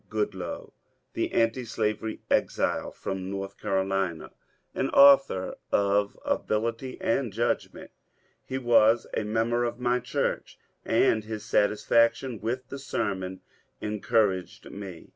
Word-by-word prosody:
Goodloe, 105 -4 -4 0.4
the - - -1
antislavery 115 -2 -1
exile - - +1
from 95 -1 -5
North 100 0 -5
Carolina, 95 -3 -1 0.4
an - - -1
author 135 -9 +6 0.2
of 100 0 +2
ability 115 +4 -2
and 120 -1 0
judgment 115 +4 -2 0.5
He 130 - -4
was 120 -2 +4
a - - 0
mem 115 +2 0
ber 120 +1 +2
of 120 0 -3
my 125 0 +1
church, - - -2 0.3
and 110 -1 +2
his 110 -1 -6
satisfaction 115 +3 +2
with 120 +3 -3
the 140 - -6
sermon 95 -8 -3 0.4
en 105 0 -3
couraged 95 -5 0
me. 95 -4 -9
110 Hz, 120 wpm, -27 LUFS, 100-120 Hz, 0.5 s, author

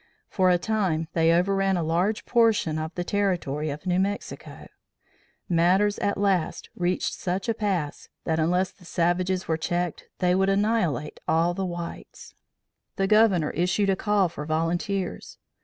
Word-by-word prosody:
For 185 -2 +2
a 180 - +4
time 175 -6 -1
they 165 0 +3
overran 195 +2 +2
a 170 - -1
large 175 +7 0
portion 225 -10 +2
of 155 +1 -4
the 175 - -2
territory 175 -7 -1
of 145 +5 -6
New 180 0 +1
Mexico. 200 +2 -4 0.8
Matters 185 +4 +2
at 200 - 0
last 195 -4 0
reached 180 0 -1
such 185 +2 -3
a 230 - +2
pass, 190 -9 -3
that 160 0 0
unless 180 +4 +1
the 180 - -22
savages 180 +2 0
were 160 - 0
checked, 175 +1 -2
they 180 -1 +2
would 190 +1 +2
annihilate 195 -7 0
all 165 +2 +2
the 190 +1 -2
whites. 175 -1 -8 0.6
The 195 - +1
Governor 200 -6 +4
issued 180 +3 +1
a - - +2
call 205 -1 +2
for 160 -3 -7
volunteers. 175 +5 -2
180 Hz, 155 wpm, -25 LUFS, 165-195 Hz, 0.8 s, a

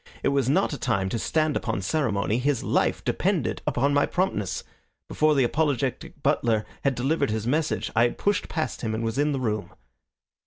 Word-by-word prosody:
It - - +3
was 140 -2 +1
not 145 - +2
a 145 - -5
time 100 -6 0
to 115 - -2
stand 155 +4 +1
upon 110 -5 -2
ceremony. 110 - 0
His 135 -1 0
life - - +1
depended - - 0
upon 140 +3 +2
my 145 0 +3
promptness. 180 - -1 0.4
Before 155 0 +2
the 135 - +4
apologetic 135 -1 -1
butler 110 -3 +2 0.2
had 140 -2 +2
delivered 140 +3 +1
his 110 0 -2
message 150 +5 0
I 115 - +4
had 120 - -2
pushed 205 -1 0
past 160 - -3
him 110 -2 -2
and 115 - -3
was 115 +4 -2
in 150 +1 +2
the 135 - -1
room. 110 -4 -2
130 Hz, 190 wpm, -25 LUFS, 110-150 Hz, 0.4 s, the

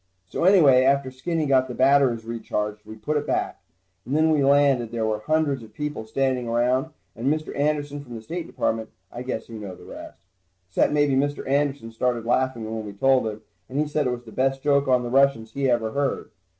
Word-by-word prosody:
So 130 - -2
anyway, 155 -10 +6
after 135 0 +2
Skinny 160 +5 -2
got 130 -2 +3
the 125 - -6
batteries 130 -4 +3
recharged, 105 -2 -4
we 110 - -8
put 150 +8 -2
it 145 0 -3
back. - - -2 0.4
And 135 +7 -1
then 160 0 +3
when 155 - +3
we - - +2
landed 140 -4 +3
there 115 -1 -1
were 110 -1 -1
hundreds 145 +2 0
of 110 -1 -14
people 150 -5 -4
standing 130 0 0
around, 125 +4 +1 0.3
and 120 +3 -4
Mr. 155 0 -3
Anderson 145 0 -1
from 120 -4 -10
the 110 - -8
State 170 +6 -5
Department. 110 0 -2 0.2
I 120 - -7
guess 125 -3 -4
you 115 -2 -8
know 100 -3 -7
the - - -15
rest. - - -11 0.5
Except 95 - +2
maybe 145 -2 +2
Mr. 145 +1 0
Anderson 140 -3 0
started 120 0 -1
laughing 125 -1 0
when 110 0 -4
we 105 -1 -8
told 130 +3 +2
him, 110 0 -6 0.3
and 130 - -5
he 150 +1 +1
said 150 -2 0
it - - 0
was 120 0 -5
the 110 - -11
best 135 +3 0
joke 140 -1 +2
on 125 -1 +3
the 120 - -4
Russians 135 -4 +3
he 140 -1 0
ever 115 -2 +1
heard. 140 +2 -2
130 Hz, 220 wpm, -24 LUFS, 115-145 Hz, 0.5 s, anyway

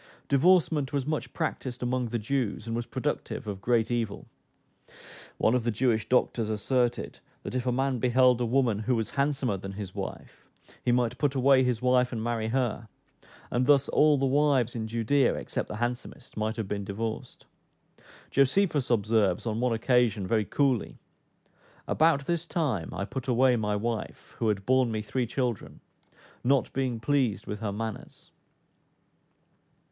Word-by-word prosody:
Divorcement 155 -1 +3
was 140 -2 -1
much 155 +1 -3
practised 130 -6 -4
among 125 0 0
the 120 - -2
Jews, 115 -1 -2
and 115 0 -3
was 120 0 -3
productive - - -3
of 100 -2 -5
great 115 +1 +1
evil. 115 -4 -2 1.1
One 110 - +2
of 125 -2 +1
the 120 - 0
Jewish 110 -1 0
doctors 120 -3 +1
asserted, 120 +3 -1 0.2
that - - -6
if 130 0 -2
a - - +3
man 130 0 0
beheld 125 0 +4
a - - +2
woman 120 -4 +2
who 120 +3 0
was 110 -1 -2
handsomer 140 -6 0
than 95 +1 -7
his 95 -2 -7
wife, - - -8 0.3
he 125 - +2
might 120 0 +1
put 145 -2 +1
away 135 0 +5
his 125 -2 -1
wife 125 0 +3
and 115 -3 -3
marry 115 -2 -1
her; 120 -2 -1 0.6
and 125 +1 +1
thus 140 -2 +5
all 150 -1 +4
the 135 - +1
wives 135 -3 +2
in 110 -1 -3
Judea, 115 +5 +2
except - - -4
the - - -6
handsomest, 120 +2 -5
might 110 +1 -2
have 110 -4 -4
been 100 0 -3
divorced. 110 +3 -5 0.9
Josephus 145 +1 +2
observes, 110 -5 +2
on 110 -1 -2
one 125 0 +1
occasion, 115 -3 +2
very 110 +1 +1
coolly, 130 +1 0 0.9
"About 155 -3 +2
this 170 +1 -2
time 135 - -1
I 100 - -3
put 130 +4 -6
away 125 0 +4
my 105 -2 -1
wife, 115 +1 -4
who 115 - +1
had 100 -2 -1
borne 130 -1 +3
me 110 -1 -2
three 120 +3 -2
children, 125 -3 -3 0.6
not 135 0 +2
being 130 -3 -1
pleased 130 -4 0
with 105 - -5
her 105 -2 -3
manners." 110 +1 -7
120 Hz, 165 wpm, -28 LUFS, 110-130 Hz, 1.1 s, away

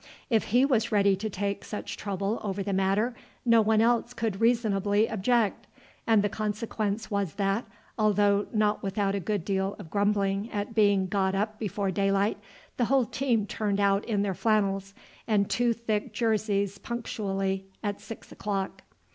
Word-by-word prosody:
If 225 -2 +3
he 245 +5 +4
was 240 -6 +1
ready 200 -2 +4
to 215 +3 -3
take 200 0 -3
such 210 - -5
trouble 200 +2 -2
over 200 -1 -2
the 200 0 -2
matter 195 +5 +1 0.3
no 230 -1 +6
one 220 0 +3
else 235 +1 +2
could 225 -4 -2
reasonably 215 -3 +2
object, 225 0 0 0.4
and 220 -3 +4
the - - +3
consequence 215 0 -3
was 200 -4 -1
that, 200 +3 0 0.3
although 205 -1 +3
not 215 -2 +1
without 195 0 -1
a 200 - 0
good 195 -1 -2
deal 195 0 -1
of 160 - -11
grumbling 200 0 +1
at 205 +2 -3
being 205 -3 +3
got 190 0 0
up 215 +2 -2
before 200 -2 -1
daylight, 200 +2 +1 0.4
the 245 - +2
whole 265 0 +3
team 235 -2 0
turned 205 0 -1
out 200 +1 +3
in 205 -3 0
their 200 -2 -1
flannels 195 -2 0 0.3
and 205 -3 +2
two 240 -1 +2
thick 220 -2 -2
jerseys 205 -3 0
punctually 195 -5 -3 0.2
at 205 -1 -3
six 225 - -10
o'clock. 195 -2 -3
205 Hz, 165 wpm, -28 LUFS, 195-220 Hz, 0.4 s, no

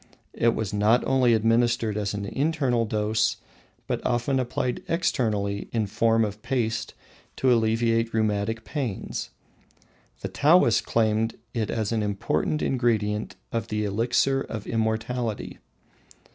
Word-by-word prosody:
It 115 0 +2
was 110 -2 -3
not 105 +4 +3
only 125 -3 +4
administered 115 0 +2
as 105 -1 -2
an 100 -1 -3
internal 135 -2 0
dose, 110 +1 0 0.5
but - - -3
often 125 +3 +1
applied 125 0 -2
externally 105 - 0
in 110 -2 0
form 115 +2 +2
of 105 0 -6
paste 115 -3 -2 0.4
to 130 -2 +3
alleviate 115 0 +2
rheumatic 110 +1 0
pains. 130 -10 -4 0.9
The - - -3
Taoists 145 -6 +4
claimed 110 0 0 0.2
it 110 -3 -1
as 110 -2 -1
an 115 -1 0
important 105 +8 -1
ingredient 110 -6 0 0.2
of 115 - -2
the 105 0 -1
elixir 120 +6 +1
of 110 -5 -6
immortality. 110 0 -2
115 Hz, 125 wpm, -25 LUFS, 105-120 Hz, 0.9 s, only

